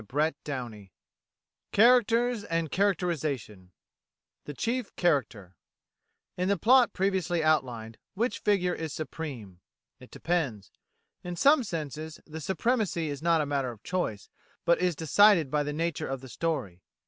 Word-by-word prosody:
CHAPTER 145 Hz, -2 st, -1 dB
IV 100 Hz, -, -15 dB, 0.9 s
CHARACTERS 235 Hz, 0 st, +4 dB
AND 165 Hz, -2 st, -2 dB
CHARACTERISATION 155 Hz, -, -1 dB, 0.7 s
The 145 Hz, -, -6 dB
Chief 240 Hz, -, -2 dB
Character 115 Hz, -, 0 dB, 0.8 s
In 180 Hz, +1 st, -1 dB
the 200 Hz, -, +2 dB
plot 245 Hz, +7 st, +5 dB
previously 185 Hz, -3 st, 0 dB
outlined, 120 Hz, -8 st, 0 dB, 0.2 s
which 235 Hz, +5 st, -1 dB
figure 180 Hz, -4 st, +1 dB
is 160 Hz, -3 st, -5 dB
supreme? 130 Hz, -, -7 dB, 0.4 s
It -, -, -14 dB
depends. 140 Hz, -, -2 dB, 0.5 s
In 180 Hz, 0 st, -5 dB
some 280 Hz, -, +5 dB
senses 155 Hz, -, -5 dB
the 160 Hz, 0 st, -8 dB
supremacy 190 Hz, -, 0 dB
is 145 Hz, -, -6 dB
not 165 Hz, -1 st, +3 dB
a -, -, -1 dB
matter 140 Hz, -3 st, -1 dB
of 115 Hz, -4 st, -11 dB
choice, 175 Hz, -, -3 dB, 0.3 s
but 170 Hz, -, +3 dB
is 180 Hz, -2 st, +1 dB
decided 165 Hz, 0 st, +4 dB
by 150 Hz, -, +2 dB
the 145 Hz, 0 st, -2 dB
nature 165 Hz, +1 st, -2 dB
of 135 Hz, -1 st, -4 dB
the 130 Hz, -, -11 dB
story. 110 Hz, -, -3 dB
160 Hz, 135 wpm, -28 LUFS, 140-185 Hz, 0.9 s, plot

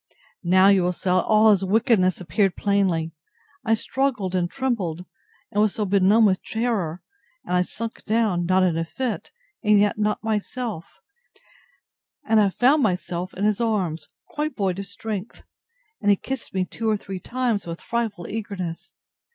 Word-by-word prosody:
Now, 185 Hz, +2 st, +5 dB
you 195 Hz, -2 st, +5 dB
will 180 Hz, +1 st, +1 dB
say, 180 Hz, +1 st, -2 dB
all 215 Hz, +4 st, +4 dB
his 195 Hz, -2 st, +2 dB
wickedness 195 Hz, -2 st, +2 dB
appeared 190 Hz, +2 st, 0 dB
plainly. 190 Hz, -6 st, +1 dB, 0.5 s
I 225 Hz, -2 st, +3 dB
struggled 235 Hz, -6 st, -1 dB
and 175 Hz, -2 st, 0 dB
trembled, 195 Hz, -11 st, -2 dB, 0.5 s
and 205 Hz, -, +1 dB
was 215 Hz, -2 st, +2 dB
so 210 Hz, -, -1 dB
benumbed 200 Hz, +3 st, +4 dB
with 190 Hz, -2 st, +2 dB
terror, 215 Hz, -8 st, -2 dB, 0.4 s
that -, -, -3 dB
I 180 Hz, -, +4 dB
sunk 225 Hz, +5 st, -5 dB
down, 210 Hz, -6 st, +1 dB
not 185 Hz, +1 st, +3 dB
in 170 Hz, -3 st, +1 dB
a -, -, 0 dB
fit, 235 Hz, +7 st, -4 dB, 0.3 s
and 210 Hz, -1 st, +5 dB
yet 210 Hz, +1 st, +2 dB
not 210 Hz, +1 st, 0 dB
myself; 220 Hz, -3 st, -3 dB, 1.4 s
and 220 Hz, -1 st, +4 dB
I 205 Hz, -2 st, +4 dB
found 265 Hz, +9 st, +3 dB
myself 180 Hz, -3 st, -2 dB
in 195 Hz, -, -4 dB
his 215 Hz, +1 st, +1 dB
arms, 190 Hz, -9 st, -1 dB, 0.2 s
quite 305 Hz, -4 st, -3 dB
void 190 Hz, -3 st, 0 dB
of 200 Hz, -, -5 dB
strength; 215 Hz, -1 st, -6 dB, 0.6 s
and 205 Hz, -, +2 dB
he 200 Hz, -, +6 dB
kissed 265 Hz, +7 st, -5 dB
me 190 Hz, -1 st, 0 dB
two 220 Hz, +5 st, -3 dB
or 215 Hz, -, +2 dB
three 195 Hz, -2 st, -7 dB
times, 235 Hz, -2 st, -2 dB
with 170 Hz, 0 st, -5 dB
frightful 230 Hz, -7 st, -3 dB
eagerness. 200 Hz, -6 st, -5 dB
200 Hz, 165 wpm, -23 LUFS, 185-225 Hz, 1.4 s, he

